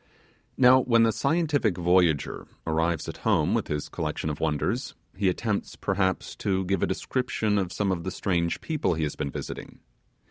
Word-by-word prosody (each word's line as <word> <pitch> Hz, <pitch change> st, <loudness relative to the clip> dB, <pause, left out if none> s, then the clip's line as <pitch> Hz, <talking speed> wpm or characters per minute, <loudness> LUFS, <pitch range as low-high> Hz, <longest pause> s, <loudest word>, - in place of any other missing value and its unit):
Now, 130 Hz, 0 st, +7 dB
when 115 Hz, -3 st, +4 dB
the 115 Hz, -, +4 dB
scientific 145 Hz, -, +1 dB
voyager 90 Hz, -4 st, +2 dB, 0.2 s
arrives 80 Hz, +1 st, 0 dB
at -, -, -6 dB
home -, -, +2 dB
with -, -, 0 dB
his 75 Hz, -1 st, -3 dB
collection 80 Hz, -, -3 dB
of 75 Hz, -, -6 dB
wonders, 75 Hz, -3 st, -1 dB, 0.2 s
he 95 Hz, -1 st, +2 dB
attempts, 105 Hz, +2 st, -2 dB
perhaps, 95 Hz, -1 st, -1 dB
to 95 Hz, -1 st, 0 dB
give 95 Hz, 0 st, 0 dB
a -, -, +2 dB
description 110 Hz, -5 st, -1 dB
of 90 Hz, -2 st, -2 dB
some 100 Hz, -1 st, 0 dB
of 85 Hz, -2 st, -2 dB
the 95 Hz, -, -2 dB
strange 85 Hz, -2 st, -1 dB
people 150 Hz, -, 0 dB
he 80 Hz, -, -1 dB
has 75 Hz, -, -2 dB
been 70 Hz, -, -3 dB
visiting. -, -, -7 dB
95 Hz, 175 wpm, -26 LUFS, 85-110 Hz, 0.2 s, Now